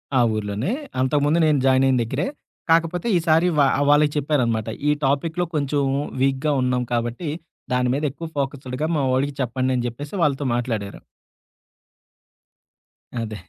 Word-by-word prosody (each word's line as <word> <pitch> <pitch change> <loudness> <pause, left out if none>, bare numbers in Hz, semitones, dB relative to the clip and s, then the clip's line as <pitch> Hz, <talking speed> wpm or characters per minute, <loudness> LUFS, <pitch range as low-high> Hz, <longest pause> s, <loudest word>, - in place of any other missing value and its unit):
ఆ 130 - +5 0.2
ఊర్లోనే. 105 - -2 0.3
అంతకు 135 +3 +2
ముందు 155 +3 +3
నేను 150 -3 +3
జాయినయిన 130 -1 +4
దగ్గరే. 115 - -2 0.4
కాకపోతే 165 +5 +2
ఈసారి 165 +1 +3
వా 140 - +6 0.2
వాళ్ళకి 145 0 +5
చెప్పారనమాట. 125 -7 0 0.2
ఈ - - +5
టాపిక్‌లో 160 +6 0
కొంచెం 145 0 0 0.4
వీక్‌గా 135 +2 +1
ఉన్నాం 125 -1 +1
కాబట్టి 120 +7 -2 0.4
దాని 125 0 +2
మీద 145 - -2
ఎక్కువ 165 +4 -7
ఫోకస్సుడుగా 135 +1 -2
మా - - +1
వోడికి 135 +2 0
చెప్పండి 130 +1 -1
అని 120 -1 -1
చెప్పేసి 145 +5 -7
వాళ్ళతో 140 -1 +1
మాట్లాడారు. 110 -5 -3 2.2
అదే. 110 -1 -5
135 Hz, 135 wpm, -22 LUFS, 125-150 Hz, 2.2 s, వా